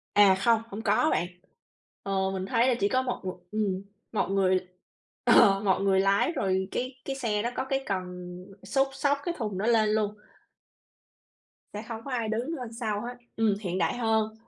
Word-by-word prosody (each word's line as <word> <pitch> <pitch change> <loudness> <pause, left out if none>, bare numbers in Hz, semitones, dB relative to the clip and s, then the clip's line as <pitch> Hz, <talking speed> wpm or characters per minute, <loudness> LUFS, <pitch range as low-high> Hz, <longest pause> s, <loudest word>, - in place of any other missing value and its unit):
À, 200 -2 +7
không, 225 +3 +3
hông 205 +3 -6
có 220 +9 +3
bạn. 175 - +1 0.8
Ờ, 190 -1 0
mình 190 0 -3
thấy 235 +4 +2
là 255 - +3
chỉ 200 - +2
có 255 +3 +2
một 255 -1 -3
một 185 0 -4
ừm, 205 -3 -1 0.3
một 215 - 0
người, 185 -2 +2 0.6
ờ, 195 0 +6
một 190 -2 +2
người 195 -1 +3
lái 195 - +3
rồi 190 - 0
cái 255 +1 -4
cái 270 - -3
xe 225 -6 -1
nó 235 - -1
có 260 - -2
cái 270 0 -1
cần 190 -2 -2 0.6
xúc, 270 +8 +1
xốc 285 +1 +1
cái 345 - -1
thùng 210 -6 -3
đó 210 - -1
lên 225 -2 +4
luôn. 210 -1 0 1.6
Sẽ 210 +2 -5
không 225 -1 -6
có 275 - -6
ai 235 -3 -1
đứng 240 +9 -2
ở 250 - -5
sau 215 -4 -1
hết, 245 +2 -6 0.2
ừm, 220 -2 +2
hiện 185 -2 -2
đại 240 - 0
hơn. 220 -2 +1
215 Hz, 195 wpm, -28 LUFS, 195-245 Hz, 1.6 s, À